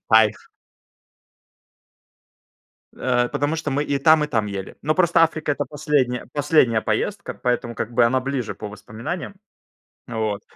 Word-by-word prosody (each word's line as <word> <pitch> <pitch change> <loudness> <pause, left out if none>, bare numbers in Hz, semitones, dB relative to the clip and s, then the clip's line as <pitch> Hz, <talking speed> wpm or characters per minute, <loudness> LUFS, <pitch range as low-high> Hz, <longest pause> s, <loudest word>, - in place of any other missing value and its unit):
Кайф! 110 -1 +4 2.5
Э, 125 -1 +1
потому 145 +5 -1
что 155 -2 -3
мы 145 +2 0
и 140 -1 0
там 155 -1 +5
и - - -2
там 110 -7 0
ели. 100 -2 -6
Но 155 +2 +1
просто 170 -1 +4
Африка- 155 -2 +1
это 145 0 -2
последняя 140 -3 0
последняя 145 -6 +3
поездка, 150 - -2
поэтому 120 -2 -1
как 115 - -4
бы 120 0 +4
она 130 +2 +2
ближе 135 -2 -3
по 105 - -7
воспоминаниям. 110 - -6 0.7
Вот. 110 -3 -2
130 Hz, 140 wpm, -22 LUFS, 110-150 Hz, 2.5 s, там